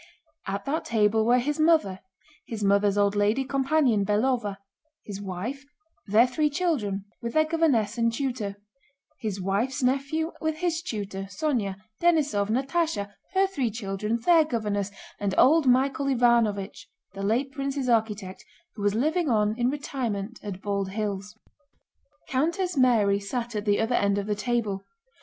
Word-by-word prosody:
At 200 +1 -3
that 305 +4 -2
table 220 -1 +2
were 245 +1 +5
his 290 +5 -1
mother, 310 - +3 0.5
his 220 -3 -5
mother's 200 0 +3
old 200 0 +2
lady 210 +6 +2
companion 270 -5 +2
Belóva, 210 0 0 0.5
his 200 -1 -6
wife, 205 +9 -5 0.4
their 215 +4 +5
three 300 +4 0
children 275 - -1 0.2
with 235 0 -4
their 310 0 +4
governess 280 -9 +1
and 230 0 +3
tutor, 235 -5 -3 0.6
his 210 -3 -3
wife's 205 +8 -1
nephew 275 +6 0
with 315 -1 0
his 335 0 -1
tutor, 205 - -5
Sónya, 200 -1 -1 0.3
Denísov, 295 -12 +2
Natásha, 265 -4 -1 0.2
her 385 +1 +5
three 280 -11 -1
children, 210 0 -2
their 330 +4 +5
governess, 210 -8 -2 0.3
and 200 -2 -1
old 305 +1 +5
Michael 270 +2 +2
Ivánovich, 235 -6 +1 0.3
the 195 - -7
late 235 +7 0
prince's 275 -1 -3
architect, 215 -5 0 0.3
who 210 - -9
was 205 0 +1
living 310 +6 +1
on 210 -2 +2
in 240 +1 +1
retirement 240 -7 -4
at 200 -2 -7
Bald 200 -1 -1
Hills. 205 0 -4 0.9
Countess 335 +7 0
Mary 225 -7 +3
sat 230 +3 -4
at 210 0 -3
the 205 -1 +2
other 225 +2 0
end 200 0 +2
of 200 - -2
the 210 - 0
table. 210 -2 -1
230 Hz, 150 wpm, -26 LUFS, 205-275 Hz, 0.9 s, were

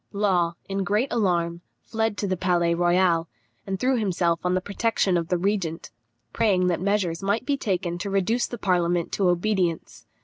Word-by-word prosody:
] - - -50 0.2
Law, 175 -2 +2
in 195 0 -2
great 210 +7 0
alarm, 170 -6 0 0.2
fled 220 -2 -2
to - - -2
the 190 -1 0
Palais 175 -2 +1
Royal, 175 -1 +2 0.4
and 190 -1 -3
threw 260 +2 +2
himself 175 -5 0
on 180 0 +1
the - - +2
protection 200 -1 0
of 170 -1 0
the 180 - +1
regent, 175 -3 -2 0.4
praying 200 -5 +2
that 175 -2 0
measures 190 -4 0
might 200 +5 0
be 285 - +1
taken 180 -8 -2
to 200 - -4
reduce 195 +5 +1
the 240 - -6
parliament 175 -4 0
to 190 -3 +1
obedience. 180 -2 -1
185 Hz, 180 wpm, -25 LUFS, 175-205 Hz, 0.4 s, Law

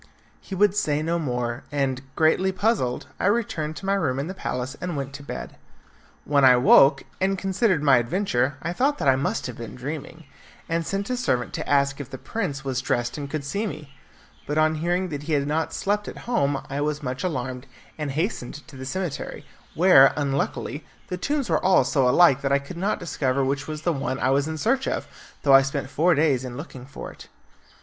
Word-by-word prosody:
He 195 - -7
would 205 +1 +3
say 150 -7 +1
no 170 +2 0
more, 125 -4 -2
and, 135 -3 -1
greatly 165 +4 +3
puzzled, 190 - 0
I - - +1
returned 205 -9 0
to 190 - -8
my 195 - +2
room 160 -10 0
in 140 - -2
the 185 - -5
palace 130 -7 -4
and 180 -4 -3
went 140 0 -4
to 145 - -8
bed. - - -7 0.7
When 140 -1 +3
I 130 -1 +8
woke, 135 +3 +6 0.2
and 195 +1 +2
considered 190 -3 +1
my 135 -3 +6
adventure, 130 - 0
I 170 +2 -2
thought 280 +9 +1
that - - -2
I 135 - +6
must 135 +2 -1
have 125 -3 -6
been 115 - -7
dreaming, 150 +5 -6 0.4
and 165 0 -1
sent 200 +4 -2
a - - +1
servant 125 - -1
to - - -4
ask 140 -1 +2
if 135 - -9
the 130 - -7
prince 145 - -4
was 130 -1 -1
dressed 120 -1 -1
and 145 -2 -5
could 155 0 -3
see 200 +9 -2
me. 150 -7 -8 0.5
But 150 - -2
on 155 0 +4
hearing 175 +2 0
that 145 -3 -4
he - - +1
had 140 -1 +2
not 155 +2 -1
slept 205 +1 -1
at - - -7
home 145 - 0
I 140 +1 -3
was 150 0 -2
much 130 +4 -3
alarmed, 130 -6 -3 0.3
and 150 -2 -4
hastened 150 - -3
to 140 - -13
the 130 0 -7
cemetery, 175 0 -4 0.3
where, 160 -6 +7
unluckily, 140 +1 -2 0.3
the 180 - -3
tombs 285 +5 -1
were - - +1
all 185 0 +5
so 135 -5 +2
alike 140 -2 +5
that 135 - -1
I 140 - +5
could 140 +6 -8
not 195 +5 -1
discover 135 -6 0
which 135 +1 -2
was 155 -1 -6
the 170 - +1
one 135 -2 -2
I 130 - +1
was 140 +2 +2
in 160 0 -4
search 265 - +1
of, - - -2 0.4
though 140 - +5
I 135 - +9
spent 135 0 -3
four 175 +3 +3
days 140 -4 +2
in 125 -1 -6
looking 135 -4 -9
for 135 - -8
it. - - -14
145 Hz, 215 wpm, -24 LUFS, 135-180 Hz, 0.7 s, I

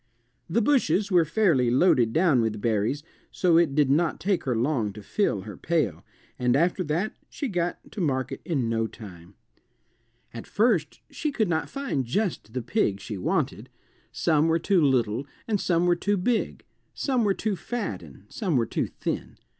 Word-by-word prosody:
The 220 +7 +2
bushes 215 -7 +2
were 175 -3 +5
fairly 160 - +2
loaded 125 -3 +4
down 160 -4 +3
with 110 -2 -1
berries, 115 +6 0 0.3
so 175 -3 +3
it 155 -5 +1
did 145 -3 +3
not 160 +3 +1
take 190 +1 0
her 125 -3 0
long 115 -3 0
to 105 0 -10
fill 105 - 0
her 100 0 -8
pail, 155 - -1 0.4
and 125 0 +2
after 175 +5 +2
that 170 +8 -1 0.2
she 280 - -4
got 175 -5 -1
to 210 - -5
market 130 -5 -1
in 140 -9 -1
no 115 0 0
time. 95 -4 -12 1.0
At 115 - -8
first 205 -9 +1
she 300 - -2
could 220 -8 0
not 160 -1 -1
find 275 - -2
just 160 - -2
the 125 -2 -3
pig 115 - 0
she 100 -1 -6
wanted. - - -1 0.4
Some 155 -1 +2
were 165 0 +3
too 180 +2 +2
little 130 -2 +1 0.2
and 210 -3 0
some 175 -1 +2
were 175 0 +4
too 205 +4 0
big; 225 +5 -1 0.3
some 255 -4 0
were 200 -2 +2
too 215 -2 -1
fat 185 - -4
and 75 +1 -14
some 185 - -2
were 120 -3 +3
too - - -2
thin. - - -5
155 Hz, 180 wpm, -26 LUFS, 120-195 Hz, 1.0 s, were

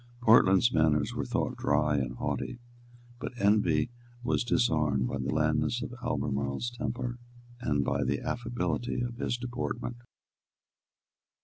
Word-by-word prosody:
Portland's 110 0 +6
manners 75 -2 +2
were - - -2
thought - - -1
dry 75 -1 +2
and 65 -2 -2
haughty; 125 - -3 0.6
but 125 - -5
envy 100 -2 +3 0.3
was 120 - +1
disarmed 75 - +2
by - - -3
the 65 - -2
blandness 75 +8 +1
of 125 - -6
Albemarle's 70 - -1
temper 120 +1 -4 0.4
and 70 - 0
by - - +1
the - - 0
affability 120 -2 -2
of 120 -1 -3
his 120 - -1
deportment. 120 0 -4
105 Hz, 125 wpm, -30 LUFS, 75-120 Hz, 0.6 s, Portland's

